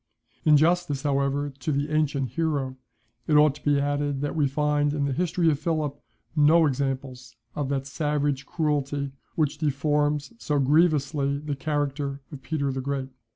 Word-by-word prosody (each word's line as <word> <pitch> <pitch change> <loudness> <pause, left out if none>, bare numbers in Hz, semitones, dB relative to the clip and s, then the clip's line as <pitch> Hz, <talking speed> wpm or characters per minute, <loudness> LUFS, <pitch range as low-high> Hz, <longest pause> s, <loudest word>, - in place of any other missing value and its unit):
In 150 -1 +7
justice, 160 -3 +1
however, 140 0 0
to 155 - -2
the 145 +1 -1
ancient 145 -4 0
hero, 140 -1 -1 0.5
it 155 - +3
ought 150 -1 +6
to 145 - -15
be 145 -1 +3
added, 145 -1 -1
that 145 - -2
we 150 -3 +2
find 145 +1 +1
in 145 -1 0
the 140 - -1
history 170 +1 +1
of 145 - -1
Philip 155 -3 -1 0.4
no 160 +2 +5
examples 130 -3 -3 0.2
of 145 -2 -3
that 135 -1 -1
savage 145 -1 -1
cruelty 145 -3 -1 0.2
which 150 -2 0
deforms 150 - 0
so 150 -8 -1
grievously 140 -1 +2
the 145 0 -4
character 140 -1 -2
of 140 -3 -8
Peter 140 0 -1
the 130 0 -3
Great. 135 0 -3
145 Hz, 160 wpm, -26 LUFS, 140-150 Hz, 0.5 s, In